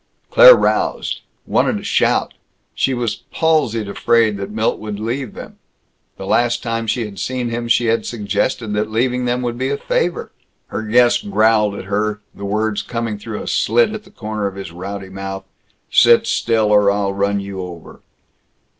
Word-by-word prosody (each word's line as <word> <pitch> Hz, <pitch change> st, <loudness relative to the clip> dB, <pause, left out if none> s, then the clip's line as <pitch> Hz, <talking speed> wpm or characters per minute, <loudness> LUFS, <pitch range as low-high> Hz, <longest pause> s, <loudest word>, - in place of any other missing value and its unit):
Claire -, -, +10 dB
roused; -, -, 0 dB, 0.2 s
wanted -, -, +1 dB
to -, -, -8 dB
shout. -, -, +1 dB, 0.4 s
She 135 Hz, -, 0 dB
was 120 Hz, -3 st, -2 dB
palsied 140 Hz, -10 st, +1 dB
afraid 110 Hz, +1 st, +2 dB
that 100 Hz, 0 st, -5 dB
Milt 110 Hz, +1 st, -1 dB
would 105 Hz, -1 st, -6 dB
leave 120 Hz, +3 st, -4 dB
them. -, -, -10 dB, 0.6 s
The 95 Hz, -, -7 dB
last 120 Hz, +3 st, +1 dB
time 115 Hz, -1 st, -2 dB
she 115 Hz, +1 st, -1 dB
had 100 Hz, -3 st, -9 dB
seen 125 Hz, +4 st, -2 dB
him, 120 Hz, 0 st, -3 dB
she 120 Hz, 0 st, +3 dB
had 115 Hz, -1 st, 0 dB
suggested 105 Hz, 0 st, -2 dB
that 105 Hz, +1 st, -1 dB
leaving 125 Hz, +3 st, 0 dB
them 125 Hz, +1 st, -1 dB
would 120 Hz, 0 st, -3 dB
be 130 Hz, +1 st, -1 dB
a 140 Hz, -, -1 dB
favor. 175 Hz, +4 st, -2 dB, 0.4 s
Her 105 Hz, -, -3 dB
guest 120 Hz, 0 st, +2 dB
growled 105 Hz, 0 st, +3 dB
at 95 Hz, -, -7 dB
her 105 Hz, +1 st, -1 dB
the 100 Hz, -, -8 dB
words 105 Hz, +1 st, -1 dB
coming 115 Hz, -3 st, -4 dB
through 110 Hz, 0 st, -6 dB
a -, -, -9 dB
slit 120 Hz, -, +2 dB
at 215 Hz, -1 st, -6 dB
the 195 Hz, -, -18 dB
corner 110 Hz, -, -4 dB
of 95 Hz, -, -7 dB
his 95 Hz, -4 st, -7 dB
rowdy 95 Hz, +3 st, -7 dB
mouth, 95 Hz, 0 st, -6 dB, 0.5 s
"Sit 120 Hz, 0 st, +6 dB
still, 110 Hz, -2 st, +1 dB
or 105 Hz, -1 st, +5 dB
I'll 100 Hz, -1 st, 0 dB
run 100 Hz, +1 st, 0 dB
you 100 Hz, -1 st, -6 dB
over." 85 Hz, -3 st, -10 dB
110 Hz, 180 wpm, -18 LUFS, 100-120 Hz, 0.6 s, Claire